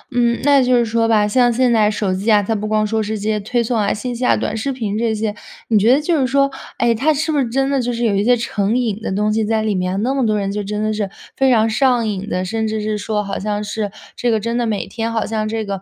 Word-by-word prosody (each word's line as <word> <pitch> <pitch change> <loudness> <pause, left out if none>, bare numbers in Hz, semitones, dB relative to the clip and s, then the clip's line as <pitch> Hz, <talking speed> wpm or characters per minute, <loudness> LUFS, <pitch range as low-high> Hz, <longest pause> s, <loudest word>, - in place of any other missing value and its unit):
嗯， 235 -1 +2
那 280 -2 +5
就 250 0 +3
是 240 -1 +3
说 225 0 +1
吧， 215 -2 +3
像 245 +3 +3
现 245 0 +2
在 215 -2 +4
手 205 -2 -1
机 200 +4 0
啊， 205 -1 +4
它 225 - -1
不 215 0 -3
光 215 0 +1
说 220 +1 0
是 215 0 -3
这 205 - -7
些 215 -1 +1
推 235 +4 -1
送 235 +2 -2
啊、 205 - +1
信 245 +3 -3
息 250 - -5
啊、 - - +3
短 215 - -2
视 275 +5 -2
频 220 -6 -3
这 225 0 0
些， 215 -1 -2 0.4
你 215 -3 +4
觉 225 +4 +4
得 270 - +5
就 315 +1 0
是 260 - +2
说， 275 +1 +2 0.3
诶， 235 -1 +2
它 280 +8 +2
是 315 +2 -1
不 295 - +1
是 250 -4 0
真 270 +3 0
的 275 -2 +1
就 245 - -2
是 235 0 -2
有 215 - +2
一 200 - +1
些 245 +1 +4
成 220 -1 -1
瘾 225 -4 -1
的 215 - -3
东 210 +2 0
西 220 0 +1
在 220 0 0
里 215 -1 0
面？ 185 +1 -1
那 260 +3 0
么 270 -2 0
多 215 -1 +1
人 195 -1 -2
就 205 +1 -3
真 210 +1 -3
的 215 0 0
是 210 -2 -2 0.3
非 270 -1 +3
常 225 -2 +4
上 240 0 +2
瘾 205 0 -4
的， 185 0 -1
甚 220 +3 -2
至 215 0 -2
是 215 0 -2
说 210 0 -2
好 195 0 -4
像 210 0 -2
是， 210 0 -3 0.3
这 245 - -1
个 220 - +2
真 230 +3 -2
的 235 - 0
每 210 -2 -2
天 230 -1 -4
好 225 - -1
像 215 -1 -2
这 220 0 -3
个， 195 -2 -4
220 Hz, 325 characters per minute, -18 LUFS, 210-240 Hz, 0.4 s, 那